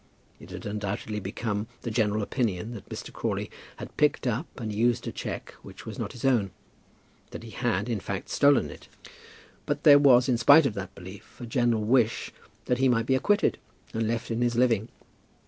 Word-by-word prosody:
It 85 Hz, -, -13 dB
had 90 Hz, 0 st, -8 dB
undoubtedly 105 Hz, 0 st, -3 dB
become 105 Hz, +1 st, -3 dB, 0.2 s
the 115 Hz, -, -3 dB
general 105 Hz, -1 st, +1 dB
opinion 110 Hz, -2 st, -2 dB
that 110 Hz, -, -10 dB
Mr. -, -, -7 dB
Crawley -, -, -3 dB, 0.2 s
had -, -, -10 dB
picked 150 Hz, -2 st, +2 dB
up 125 Hz, +6 st, -1 dB
and 110 Hz, -3 st, -4 dB
used 120 Hz, +2 st, +1 dB
a -, -, -2 dB
cheque -, -, -6 dB
which -, -, -12 dB
was -, -, -7 dB
not -, -, -4 dB
his 120 Hz, -, -6 dB
own; 120 Hz, -7 st, +3 dB, 0.8 s
that -, -, -9 dB
he 115 Hz, -, -10 dB
had, 110 Hz, -4 st, -1 dB
in 115 Hz, -4 st, -1 dB
fact, 100 Hz, 0 st, -5 dB
stolen 140 Hz, -, +3 dB
it; -, -, -13 dB, 0.8 s
but 145 Hz, 0 st, -2 dB
there 145 Hz, -2 st, +8 dB
was, 125 Hz, -3 st, +6 dB
in 125 Hz, -3 st, +1 dB
spite 145 Hz, +5 st, +7 dB
of 130 Hz, -, 0 dB
that 100 Hz, -1 st, -7 dB
belief, 95 Hz, +1 st, -12 dB
a 120 Hz, -, -6 dB
general 120 Hz, -2 st, +1 dB
wish 115 Hz, 0 st, +1 dB, 0.3 s
that 125 Hz, 0 st, 0 dB
he 135 Hz, 0 st, +4 dB
might 115 Hz, -2 st, +2 dB
be 130 Hz, -, +1 dB
acquitted 205 Hz, +11 st, +2 dB, 0.3 s
and 110 Hz, 0 st, -1 dB
left 115 Hz, +1 st, -2 dB
in 115 Hz, +1 st, -1 dB
his 120 Hz, -1 st, +1 dB
living. 115 Hz, -2 st, +2 dB
115 Hz, 195 wpm, -27 LUFS, 105-125 Hz, 0.8 s, there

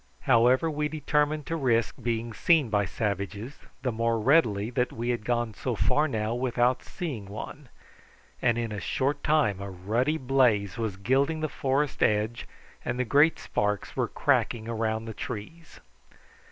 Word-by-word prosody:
However 125 Hz, +5 st, +4 dB
we 150 Hz, -1 st, -1 dB
determined 150 Hz, -1 st, 0 dB
to 165 Hz, -, -2 dB
risk 120 Hz, -7 st, +1 dB
being 115 Hz, -1 st, -2 dB
seen 150 Hz, -2 st, +3 dB
by 105 Hz, -1 st, +2 dB
savages, 105 Hz, +5 st, -4 dB, 0.2 s
the 125 Hz, -, 0 dB
more 115 Hz, 0 st, 0 dB
readily 115 Hz, -5 st, +3 dB
that 125 Hz, 0 st, 0 dB
we 120 Hz, +2 st, -4 dB
had 120 Hz, -3 st, -1 dB
gone 120 Hz, -1 st, -1 dB
so 125 Hz, +3 st, -3 dB
far 150 Hz, +8 st, +2 dB
now 110 Hz, -4 st, -2 dB
without 125 Hz, 0 st, +1 dB
seeing 140 Hz, -, -6 dB
one, 125 Hz, +7 st, -8 dB, 0.7 s
and 120 Hz, -1 st, +2 dB
in 115 Hz, -2 st, -2 dB
a 105 Hz, -, -4 dB
short 140 Hz, +5 st, -1 dB
time 145 Hz, -11 st, +2 dB
a 100 Hz, -, -5 dB
ruddy 110 Hz, -, 0 dB
blaze 125 Hz, -7 st, +2 dB
was 110 Hz, -4 st, -2 dB
gilding 135 Hz, +10 st, +1 dB
the 155 Hz, -, 0 dB
forest 140 Hz, +2 st, -1 dB
edge 110 Hz, +2 st, +1 dB, 0.4 s
and 120 Hz, 0 st, -2 dB
the 130 Hz, -, 0 dB
great 145 Hz, +7 st, +4 dB
sparks 105 Hz, -1 st, -2 dB
were -, -, 0 dB
cracking 115 Hz, -2 st, 0 dB
around 110 Hz, -1 st, -1 dB
the 115 Hz, -, -6 dB
trees. 155 Hz, +12 st, -8 dB
120 Hz, 160 wpm, -27 LUFS, 110-140 Hz, 0.7 s, However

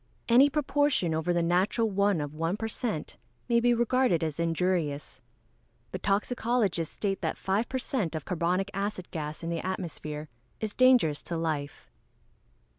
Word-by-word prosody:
_ -, -, -39 dB, 0.3 s
Any 270 Hz, +4 st, +8 dB
proportion 290 Hz, -, +1 dB
over 160 Hz, +2 st, 0 dB
the 175 Hz, -1 st, +2 dB
natural 185 Hz, +7 st, +2 dB
one 200 Hz, -4 st, +2 dB
of 145 Hz, 0 st, -5 dB
1 165 Hz, +5 st, -1 dB
per 225 Hz, -, -3 dB
cent. 220 Hz, -7 st, -4 dB, 0.3 s
may 235 Hz, -1 st, +4 dB
be 240 Hz, +1 st, +3 dB
regarded 240 Hz, -6 st, +2 dB
as 155 Hz, -1 st, -3 dB
injurious. 165 Hz, -3 st, -1 dB, 0.7 s
But -, -, -5 dB
toxicologists 205 Hz, -4 st, 0 dB
state 195 Hz, -2 st, -2 dB
that -, -, -2 dB
five 200 Hz, +5 st, 0 dB
per 260 Hz, -, -1 dB
cent. 225 Hz, -, -2 dB
of 155 Hz, -, -4 dB
carbonic 180 Hz, +3 st, 0 dB
acid 195 Hz, -2 st, -3 dB
gas 155 Hz, 0 st, -5 dB
in 165 Hz, -, -2 dB
the 165 Hz, -, -1 dB
atmosphere 155 Hz, -5 st, -4 dB, 0.3 s
is 215 Hz, -1 st, -3 dB
dangerous 250 Hz, -, +4 dB
to 170 Hz, -, -3 dB
life. 155 Hz, -3 st, -3 dB
185 Hz, 160 wpm, -28 LUFS, 165-230 Hz, 0.7 s, Any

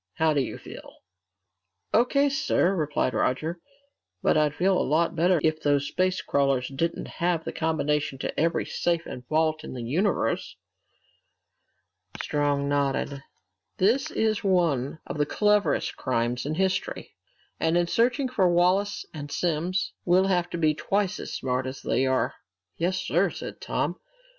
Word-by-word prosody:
How 160 Hz, -1 st, +2 dB
do 145 Hz, -, +2 dB
you 130 Hz, -, -4 dB
feel?" -, -, -11 dB, 1.0 s
"O.K., 275 Hz, +5 st, +4 dB
sir," 235 Hz, -8 st, +1 dB
replied 150 Hz, -6 st, 0 dB
Roger. 155 Hz, +9 st, -1 dB, 0.6 s
"But -, -, +3 dB
I'd 150 Hz, -1 st, +2 dB
feel 190 Hz, +4 st, +2 dB
a -, -, +2 dB
lot 165 Hz, +4 st, +1 dB
better 175 Hz, +1 st, +3 dB
if 155 Hz, 0 st, +1 dB
those 145 Hz, -1 st, +2 dB
space 185 Hz, 0 st, 0 dB
crawlers 135 Hz, -3 st, +1 dB
didn't 165 Hz, +5 st, -2 dB
have 170 Hz, -1 st, -1 dB
the -, -, -4 dB
combination 150 Hz, -3 st, -1 dB
to -, -, -4 dB
every 165 Hz, +2 st, +1 dB
safe 170 Hz, -1 st, -1 dB
and 125 Hz, -, -7 dB
vault 155 Hz, 0 st, +1 dB
in -, -, -7 dB
the 120 Hz, -, -5 dB
universe!" 165 Hz, -, 0 dB, 1.6 s
Strong 145 Hz, -1 st, 0 dB
nodded. 140 Hz, 0 st, 0 dB, 0.6 s
"This 230 Hz, +8 st, +2 dB
is 220 Hz, -1 st, 0 dB
one 165 Hz, -8 st, +1 dB
of -, -, -6 dB
the 145 Hz, -, +3 dB
cleverest 210 Hz, +2 st, +2 dB
crimes 120 Hz, 0 st, -1 dB
in 155 Hz, -, -2 dB
history. 190 Hz, -, -1 dB, 0.5 s
And 165 Hz, +1 st, +2 dB
in 175 Hz, -, +3 dB
searching 245 Hz, -, +1 dB
for 205 Hz, -8 st, +2 dB
Wallace 180 Hz, +4 st, +2 dB
and 145 Hz, -2 st, -7 dB
Simms, 175 Hz, +2 st, -1 dB
we'll 185 Hz, +2 st, +4 dB
have 180 Hz, -2 st, +1 dB
to 170 Hz, -, -4 dB
be 155 Hz, -2 st, +3 dB
twice 195 Hz, +4 st, -1 dB
as -, -, -6 dB
smart 130 Hz, 0 st, -2 dB
as 130 Hz, +1 st, -7 dB
they 130 Hz, +3 st, +1 dB
are!" 130 Hz, 0 st, +1 dB, 0.4 s
"Yes, 180 Hz, +3 st, 0 dB
sir," 185 Hz, 0 st, +1 dB
said -, -, -8 dB
Tom. -, -, -2 dB
160 Hz, 155 wpm, -26 LUFS, 145-185 Hz, 1.6 s, O.K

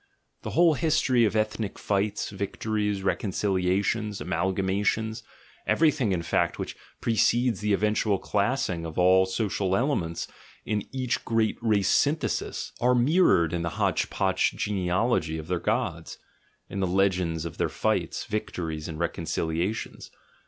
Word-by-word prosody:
(The -, -, -5 dB
whole 170 Hz, -2 st, +6 dB
history 130 Hz, -5 st, +2 dB
of 110 Hz, -, 0 dB
ethnic 110 Hz, -1 st, -1 dB
fights, 100 Hz, 0 st, -1 dB
victories, 105 Hz, 0 st, -2 dB
reconciliations, 100 Hz, +2 st, 0 dB
amalgamations, 95 Hz, +6 st, -1 dB, 0.5 s
every 160 Hz, -1 st, +4 dB
thing, 125 Hz, -9 st, -1 dB
in 85 Hz, -3 st, -1 dB
fact, -, -, 0 dB
which -, -, -5 dB, 0.3 s
precedes 120 Hz, 0 st, +2 dB
the 105 Hz, 0 st, -1 dB
eventual 105 Hz, 0 st, +1 dB
classing 100 Hz, -4 st, -1 dB
of 80 Hz, -1 st, -7 dB
all 95 Hz, +1 st, +5 dB
the 95 Hz, -, -8 dB
social 95 Hz, -2 st, 0 dB
elements 95 Hz, -, -1 dB, 0.4 s
in 105 Hz, -1 st, -2 dB
each 130 Hz, -2 st, -2 dB
great 115 Hz, -1 st, 0 dB
race 105 Hz, -4 st, +2 dB
svnthesis, 150 Hz, +3 st, 0 dB
are 125 Hz, +1 st, +4 dB
mir 145 Hz, +10 st, +3 dB
rored 85 Hz, -1 st, +3 dB
in 85 Hz, -, -1 dB
the 85 Hz, -, -1 dB
hotch -, -, +1 dB
potch -, -, +1 dB
genealogy 90 Hz, -3 st, 0 dB
of 80 Hz, 0 st, -7 dB
their 90 Hz, -1 st, -1 dB
gods, -, -, -2 dB, 0.5 s
in 100 Hz, -, -5 dB
the 95 Hz, -, +1 dB
legends 90 Hz, -3 st, +1 dB
of 85 Hz, -, -7 dB
their -, -, +1 dB
fights, -, -, -1 dB
victories, 80 Hz, -7 st, -4 dB
and 80 Hz, -, -6 dB
reconciliations. 85 Hz, +3 st, -2 dB
100 Hz, 140 wpm, -27 LUFS, 90-110 Hz, 0.5 s, whole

